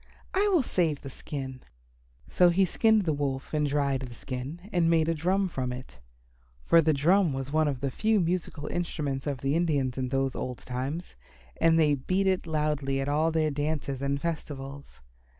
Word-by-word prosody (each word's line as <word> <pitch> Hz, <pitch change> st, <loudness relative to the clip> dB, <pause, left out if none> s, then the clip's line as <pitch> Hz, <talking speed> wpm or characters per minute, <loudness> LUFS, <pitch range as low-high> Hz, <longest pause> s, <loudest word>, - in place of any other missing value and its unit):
I 400 Hz, +2 st, +3 dB
will 345 Hz, -8 st, +4 dB
save 165 Hz, -, 0 dB
the 135 Hz, -, -7 dB
skin." 130 Hz, -2 st, -6 dB, 0.7 s
So 180 Hz, -1 st, +4 dB
he 190 Hz, +3 st, +3 dB
skinned 220 Hz, +4 st, +3 dB
the 160 Hz, -4 st, +1 dB
Wolf 140 Hz, -1 st, -3 dB
and 150 Hz, -1 st, +2 dB
dried 140 Hz, -2 st, +1 dB
the 125 Hz, -2 st, -8 dB
skin 140 Hz, +11 st, -6 dB
and 170 Hz, -2 st, +3 dB
made 165 Hz, -1 st, +3 dB
a 165 Hz, -, +2 dB
drum 185 Hz, +5 st, +1 dB
from 130 Hz, -7 st, -3 dB
it. 125 Hz, -, -9 dB, 0.6 s
For 165 Hz, -, +5 dB
the 160 Hz, 0 st, +3 dB
drum 165 Hz, +3 st, +3 dB
was 135 Hz, +1 st, -4 dB
one 155 Hz, 0 st, +3 dB
of 135 Hz, -3 st, -2 dB
the 135 Hz, -1 st, -1 dB
few 220 Hz, -, +2 dB
musical 170 Hz, -4 st, -2 dB
instruments 150 Hz, -5 st, -3 dB
of 140 Hz, -3 st, -2 dB
the 135 Hz, +1 st, 0 dB
Indians 140 Hz, -7 st, 0 dB
in 130 Hz, -1 st, -1 dB
those 135 Hz, 0 st, 0 dB
old 125 Hz, -1 st, -4 dB
times, 135 Hz, +7 st, -5 dB, 0.4 s
and 165 Hz, 0 st, +4 dB
they 155 Hz, -2 st, +4 dB
beat 185 Hz, +8 st, 0 dB
it 185 Hz, -2 st, +1 dB
loudly 150 Hz, -3 st, 0 dB
at 135 Hz, +1 st, -1 dB
all 155 Hz, +3 st, +2 dB
their 155 Hz, -1 st, +1 dB
dances 145 Hz, -2 st, -2 dB
and 140 Hz, 0 st, 0 dB
festivals. 140 Hz, -, -6 dB
150 Hz, 185 wpm, -28 LUFS, 135-170 Hz, 0.7 s, For